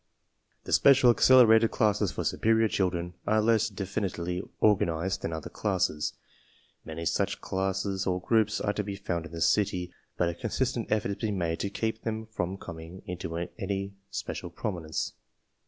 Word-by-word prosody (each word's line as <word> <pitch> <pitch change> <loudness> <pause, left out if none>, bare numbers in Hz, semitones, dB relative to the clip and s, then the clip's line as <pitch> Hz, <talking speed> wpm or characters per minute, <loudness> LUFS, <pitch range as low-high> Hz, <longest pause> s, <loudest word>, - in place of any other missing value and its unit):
The - - -4
special 135 -3 +7
accelerated 115 -2 +6
classes 105 -3 +1
for - - -3
superior 110 0 +2
children 90 -3 -1
are 110 - +3
less 110 0 +3
definitely 95 -3 -3 0.2
organized 95 -3 +2
than 80 - -3
other 80 -2 -5
classes. 90 -7 0 0.7
Many 80 +1 -6
such - - 0
classes 95 0 -2
or 90 -1 +1
groups 110 +2 +2
are 105 - 0
to 105 - -2
be 100 0 -5
found 85 -4 -3
in - - -17
the 85 0 -6
city, 90 -1 +1 0.2
but 90 - +2
a 85 - -1
consistent 120 +5 -2
effort 105 -2 +1
is 100 - -4
being 105 -3 -2
made 85 -2 -1
to 100 - -1
keep 110 +2 -2
them 110 0 -3
from 95 -4 -3
com 85 -4 -8
ing 85 +3 -10
into 85 -2 -5 0.2
any 100 0 -3 0.2
special - - -5
prominence. 85 -6 -3
95 Hz, 165 wpm, -28 LUFS, 90-110 Hz, 0.7 s, special